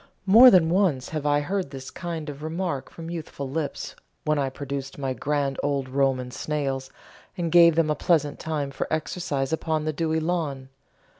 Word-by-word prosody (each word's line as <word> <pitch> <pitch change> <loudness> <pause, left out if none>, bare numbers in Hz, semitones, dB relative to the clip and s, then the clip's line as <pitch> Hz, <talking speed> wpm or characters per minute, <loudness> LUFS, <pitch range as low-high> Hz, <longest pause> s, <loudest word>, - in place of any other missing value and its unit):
More 225 +6 +9
than 175 -7 +5
once 175 -9 +1
have 155 -2 -3
I 145 0 +3
heard 190 +2 -2
this 135 -1 -8
kind 170 -3 -5
of 145 -1 -7
remark 160 -3 -3
from 165 0 -8
youthful 155 -4 -5
lips 145 +2 -4 0.3
when 155 -1 +2
I 135 -1 0
produced 135 0 -6
my 135 -2 -2
grand 140 +2 -1
old 140 -2 -1
Roman 130 -1 0
snails 135 -1 -3 0.5
and 170 -2 -2
gave 170 -2 +7
them 160 -2 +2
a - - +1
pleasant 150 -2 +1
time 150 -3 -3
for 135 - -4
exercise 155 -3 -2
upon 160 -1 -1
the 155 - -1
dewy 160 +1 0
lawn. 155 -6 -2
150 Hz, 175 wpm, -25 LUFS, 135-165 Hz, 0.5 s, More